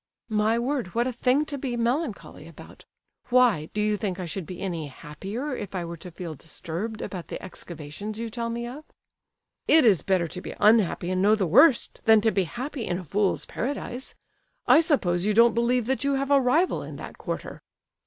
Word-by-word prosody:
"My 215 +1 +2
word! 240 -6 -2
what 235 +1 +2
a 255 - -2
thing 255 +5 +2
to 285 -2 -5
be 255 -3 -3
melancholy 240 +1 -2
about! - - -14 0.4
Why, 240 -11 +3
do 210 - -4
you 210 0 +1
think 195 -3 -3
I 180 - -3
should 170 0 -5
be 180 - -7
any 170 -6 -3
happier 200 - -6
if 200 -4 -6
I 175 -2 -2
were 170 0 -7
to 180 - -9
feel 170 -1 -7
disturbed 175 +8 -6
about 180 -3 -6
the - - -6
excavations 180 +3 -7
you 230 +1 -3
tell 235 0 -3
me 235 +1 -3
of?" 265 +6 -8 0.8
"It 315 -3 +6
is 195 -10 +5
better 185 -1 +1
to 180 +3 -6
be - - -7
unhappy 210 -5 +3
and 185 0 0
know 210 +2 +5
the 205 -3 0
worst, 235 - +4
than 220 -1 +7
to 220 +1 +3
be 195 -2 +1
happy 255 - -5
in 175 - -1
a 185 - -6
fool's 195 +4 0
paradise! 255 0 -5 0.5
I - - +7
suppose 195 - +1
you 210 - +1
don't 230 0 +6
believe 235 +1 +1
that 265 +2 -1
you 280 0 +1
have 275 +1 -1
a 280 -1 +6
rival 310 +9 +2
in - - -8
that - - -9
quarter?" - - -5
215 Hz, 205 wpm, -26 LUFS, 185-250 Hz, 0.8 s, than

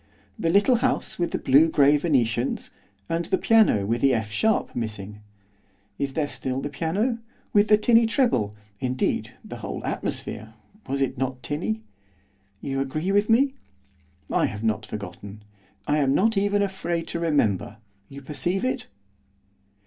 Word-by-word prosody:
The 165 - +1
little 205 +8 +4
house 225 - -1
with 175 - +1
the - - -2
blue 145 +5 +5
grey 145 -1 +5
venetians, 130 -6 0 0.4
and 165 +1 -1
the 190 - +1
piano 215 - +4
with 115 +3 -1
the 135 -2 +4
F 110 -2 -3
sharp 220 - +1
missing? 105 -3 -5 0.8
Is 140 -1 -2
there 150 -1 0
still 130 -2 -4
the 145 +1 -4
piano? 195 - -1 0.3
with 205 0 +5
the 210 - +6
tinny 230 +1 +4
treble, 125 - +1 0.2
indeed, 130 -1 -1
the - - -7
whole - - -6
atmosphere, 110 +1 -4 0.3
was 140 +1 -2
it 130 -2 -1
not 130 -1 -3
tinny? 110 -5 -3 0.8
You 135 -1 -2
agree 155 +7 -1
with 205 +2 +2
me? 265 +4 +4 0.8
I - - +2
have 105 +1 -6
not 110 -1 0
forgotten. 100 +1 -8 0.4
I 150 +1 +1
am 135 -1 +2
not 225 +3 +3
even 205 +1 +2
afraid 175 -4 -2
to 170 - -3
remember, 115 - 0 0.3
you 140 0 -10
perceive 175 - -1
it? 255 - -2
145 Hz, 155 wpm, -25 LUFS, 120-195 Hz, 0.8 s, the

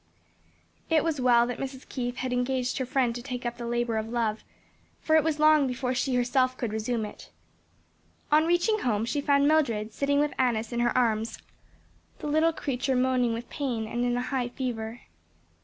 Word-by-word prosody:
It 320 -2 +3
was 315 -5 -1
well 240 -1 +5
that 245 -1 -4
Mrs. 265 -1 -6
Keith 245 -2 -3
had 255 0 -3
engaged 250 +1 -1
her 260 - -2
friend 255 -3 +1
to 240 - -6
take 250 -1 -6
up 240 0 -3
the 235 -1 -5
labor 240 -1 0
of 220 0 -3
love, 225 -2 -1 0.6
for 315 - +2
it 315 - +5
was 315 -1 0
long 305 -2 +5
before 250 0 -2
she 255 0 0
herself 255 +1 +1
could 230 -4 -3
resume 220 +1 -1
it. 210 - -11 1.0
On 310 +2 +5
reaching 350 +6 +2
home 220 - 0
she 285 +5 -1
found 280 0 +3
Mildred 230 -9 +1
sitting 285 +3 +1
with 295 0 +1
Annis 235 -3 +1
in 235 - -1
her 240 +1 +1
arms, 225 -2 +1 0.8
the - - -9
little 315 +2 +3
creature 270 -4 -2
moaning 250 -2 +2
with 235 +1 -5
pain 245 -6 -2
and 240 +2 -2
in 245 0 +1
a 245 - -1
high 255 -2 -2
fever. 240 -2 -4
250 Hz, 190 wpm, -27 LUFS, 235-280 Hz, 1.0 s, well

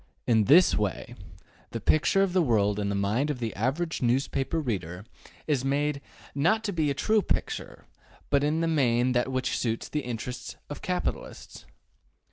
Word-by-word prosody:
In 110 -3 +3
this 170 - +6
way 105 -4 -2 0.6
the - - -5
picture 195 +5 +3
of 190 -2 -1
the 185 - +4
world 105 -7 +2
in 100 -1 -1
the 100 - -1
mind 105 +9 0
of 145 - -2
the 115 -3 -4
average 150 - -1
newspaper 135 +5 0
reader 95 - -4 0.4
is 140 -5 0
made 140 +1 0 0.4
to 210 +8 +1
be 160 -3 0
not - - +1
a - - +1
true 215 +8 +2
picture, - - -3 0.5
but 140 -1 +3
in 155 +2 +1
the 165 - +1
main 125 -5 +2
that 125 +1 0
which 130 0 -1
suits 115 -2 -2
the 150 - -1
interests 125 0 -6 0.2
of 145 - -6
capitalists. 180 -1 -4
135 Hz, 170 wpm, -27 LUFS, 115-155 Hz, 0.6 s, this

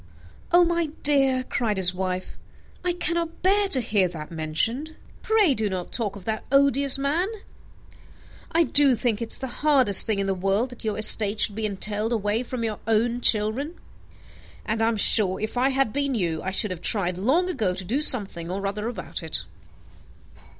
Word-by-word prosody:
"Oh, 350 +1 +5
my 340 -1 -1 0.2
dear," 270 -3 +2
cried 230 -5 -3
his 180 -1 +3
wife, 185 0 -5 0.4
"I 360 -1 0
cannot 340 -1 -4
bear 400 +2 +2
to 275 - +6
hear 210 -5 0
that 160 -3 -10
mentioned. 225 - -3 0.3
Pray 430 -9 +2
do 220 -4 -2
not 185 -2 -6
talk 210 -5 -2
of 200 - -12
that 220 -1 -4
odious 275 0 +5
man. 295 +7 -1 1.2
I 335 +1 +2
do 285 -4 +2
think 230 -1 -2
it 230 - -3
is - - +4
the 265 - -6 0.2
hardest 265 -10 +5
thing 215 -2 -1
in 195 - -2
the 195 - -1
world, 195 +7 -2
that 245 - -9
your 215 -2 -3
estate 215 -1 +3
should 205 - +3
be 215 +1 -3
entailed 210 +3 -2
away 210 0 -1
from 250 -1 -6
your 220 -2 -4
own 230 +2 0
children; 235 +10 +3 0.9
and 220 +1 -3
I 225 - +2
am 230 -1 -1
sure, 200 -2 +4
if 215 +3 -5
I 255 +2 +1
had 270 -5 -1
been 280 -2 -2
you, 170 -7 -2
I 190 - -4
should 190 +1 0
have 180 -2 -7
tried 185 -4 0
long 290 - +1
ago 220 - -2
to 185 0 -7
do 250 +10 -2
something 200 - +3
or 195 +2 -5
other 210 +2 -4
about 215 -7 -7
it." 160 -1 -2
225 Hz, 190 wpm, -23 LUFS, 195-275 Hz, 1.2 s, to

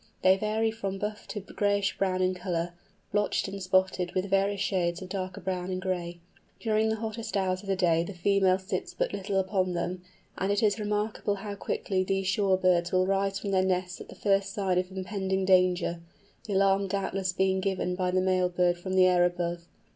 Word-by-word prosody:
They 185 0 +6
vary 215 +2 0
from 195 -3 -4
buff 210 +1 -5
to 210 - -5
grayish 200 0 0
brown 185 -1 +1
in 185 0 +2
colour, 175 -2 -3 0.4
blotched 205 -1 +1
and 195 0 -6
spotted 185 -1 +1
with 190 +1 -1
various 195 +1 +2
shades 180 -4 0
of 185 - -8
darker 185 -1 -4
brown 185 -1 -3
and 185 0 -2
gray. 175 -2 -3 0.4
During 220 -1 +1
the 220 - +1
hottest 220 -1 -4
hours 185 -1 0
of 205 - -13
the 195 - +1
day 170 -3 +3
the 185 +2 -7
female 190 +1 +3
sits 190 +1 -4
but - - -1
little 195 0 -1
upon 185 -1 0
them, 175 +1 -3 0.4
and 195 +1 0
it 205 +2 +1
is 210 +1 +2
remarkable 210 0 -1
how 205 +1 -6
quickly 190 -1 -1
these 195 0 -1
shore 190 0 +2
birds 175 -2 +2
will 185 0 +3
rise 195 0 0
from 200 0 -4
their 190 -1 +3
nests 180 -1 -1
at - - -11
the - - -10
first 200 0 +1
sign 190 -4 +1
of 185 +1 -3
impending 190 0 -2
danger—the 180 +2 0
alarm 195 0 +3
doubtless 195 -1 -1
being 190 +1 +1
given 190 -2 -1
by 180 0 -1
the 185 0 +2
male 185 -1 +2
bird 175 0 +1
from 185 +1 -4
the 185 -1 +6
air 180 -1 +4
above. 175 -1 -1
190 Hz, 200 wpm, -28 LUFS, 185-200 Hz, 0.4 s, They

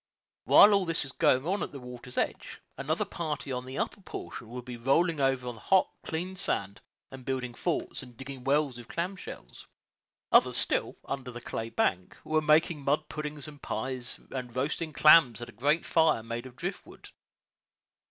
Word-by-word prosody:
While 210 - +8
all 200 -2 +3
this 165 -1 0
was 135 - -7
going 130 +1 +3
on 195 +4 0
at - - -3
the 140 - -8
water's 125 0 -10
edge, - - -2 0.2
another 150 +4 -1
party 150 -4 -4
on 125 0 -3
the 130 - -6
upper 200 - -2
portion 120 - -8
would 125 0 -7
be 125 -1 -6
rolling 145 +7 +2
over 135 -2 +1
on 120 - -3
the 110 - -14
hot, 190 -1 +3
clean 180 +4 -4
sand, 100 - -2 0.3
and 135 -1 -9
building 125 -2 -3
forts, 170 +7 -2
and 125 -3 -13
digging 135 -1 -8
wells 140 -2 +1
with 120 - -11
clam 180 +3 -3
shells; - - -10 0.6
others - - +5
still, - - +1
under 135 -2 -4
the 120 -1 -7
clay 115 -1 -5
bank, 90 -5 -1
were 155 0 +1
making 155 0 +3
mud 140 +2 0
puddings 150 -1 -4
and 145 -2 -11
pies, 125 +2 -3
and 125 -2 -5
roasting 150 +5 -1
clams 150 -5 +6
at 120 0 -7
a - - -10
great 145 +9 +1
fire 160 -8 +3
made 115 +2 -5
of 125 - -14
drift 175 +7 -4
wood. - - -14
135 Hz, 190 wpm, -29 LUFS, 125-155 Hz, 0.6 s, While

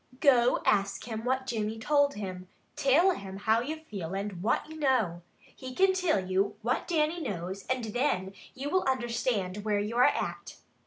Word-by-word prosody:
Go 250 -5 +4
ask 195 -1 +1
him 220 -1 -4
what 260 +1 0
Jimmy 220 -3 -2
told 285 +4 +2
him. 185 -3 -6 0.3
Till 315 +8 +4
him 195 - -6
how 220 +3 +2
you 310 +6 -4
feel 195 - -6
and 195 -2 -4
what 225 +8 0
you 315 0 -9
know. 235 - +1 0.3
He 255 -1 -8
can 385 0 +4
till 365 - +2
you 195 +2 0
what 245 +3 0
Dannie 325 0 +1
knows 190 - -5
and 255 -2 -1
thin 210 -5 -1 0.2
you 280 +2 -4
will 370 - +3
understand 235 -6 -1
where 210 -1 +1
you 210 +3 -3
are 250 - +6
at." - - -1
235 Hz, 175 wpm, -29 LUFS, 200-280 Hz, 0.3 s, are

